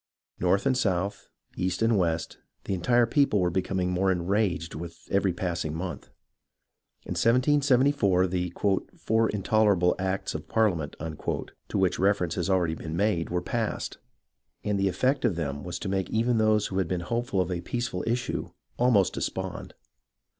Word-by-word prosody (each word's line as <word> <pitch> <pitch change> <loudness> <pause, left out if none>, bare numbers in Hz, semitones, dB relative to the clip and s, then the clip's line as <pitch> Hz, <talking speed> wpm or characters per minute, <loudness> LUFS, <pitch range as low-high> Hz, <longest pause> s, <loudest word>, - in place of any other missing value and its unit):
North 90 +3 +2
and 135 -1 +3
south, 100 -4 -1 0.3
east 90 +4 -1
and 115 0 +3
west, 85 -4 -1 0.2
the - - -3
entire 120 +7 +3
people 125 -3 +2
were 90 -1 +1
becoming 90 0 -1
more 95 +1 +2
enraged 90 -1 0
with 85 +1 -8
every 100 -1 +2
passing 85 -3 -3
month. 90 +2 -5 1.0
In - - -8
1774, 125 -5 +3
the 90 -1 -2 0.5
"four 110 0 +1
intolerable 100 -3 +2
acts 95 +1 -2
of - - -6
Parliament," 90 -10 +1
to 80 +5 -5
which 95 -2 +1
reference 95 -3 +2
has 90 +2 -2
already 90 -4 +2
been 80 0 -5
made, 100 -4 +1
were 90 0 -1
passed; 115 +3 -3 0.6
and 105 -1 0
the 95 0 +2
effect 130 +10 +1
of 115 -8 +2
them 70 -3 -3
was 90 -1 -4
to - - -5
make 95 -1 -1
even 115 +1 +1
those 110 -1 +3
who 95 - -2
had 95 - 0
been 90 0 -2
hopeful 115 +2 -1
of 90 0 0
a 85 -1 -2
peaceful 120 -5 -3
issue, 120 +2 -1 0.3
almost 120 -6 +4
despond. - - -4
95 Hz, 160 wpm, -27 LUFS, 90-110 Hz, 1.0 s, almost